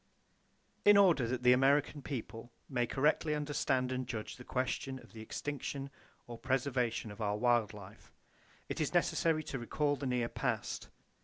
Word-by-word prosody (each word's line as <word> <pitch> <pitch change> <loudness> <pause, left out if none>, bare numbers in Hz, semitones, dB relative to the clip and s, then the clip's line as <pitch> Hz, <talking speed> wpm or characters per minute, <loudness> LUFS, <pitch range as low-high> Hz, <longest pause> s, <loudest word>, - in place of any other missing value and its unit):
In 205 0 +7
order 170 -11 +5
that 125 +1 -2
the 125 0 +7
American 140 +3 +3
people 120 -3 -6 0.2
may 125 -3 0
correctly 150 +3 +2
understand 140 -3 0
and 130 -1 -2
judge 110 -4 -5
the 125 - -10
question 130 +1 -2
of - - -15
the 110 - -9
extinction 140 +3 -4 0.3
or 120 -1 -9
preservation 125 -4 0
of 105 - -9
our 105 -1 0
wild 120 -2 +3
life, 100 -1 -13 0.6
it - - -3
is - - -1
necessary 160 -2 +2
to 135 - -4
recall 145 +5 0
the 140 0 -4
near 125 -2 0
past. - - -3
130 Hz, 160 wpm, -34 LUFS, 120-145 Hz, 0.6 s, In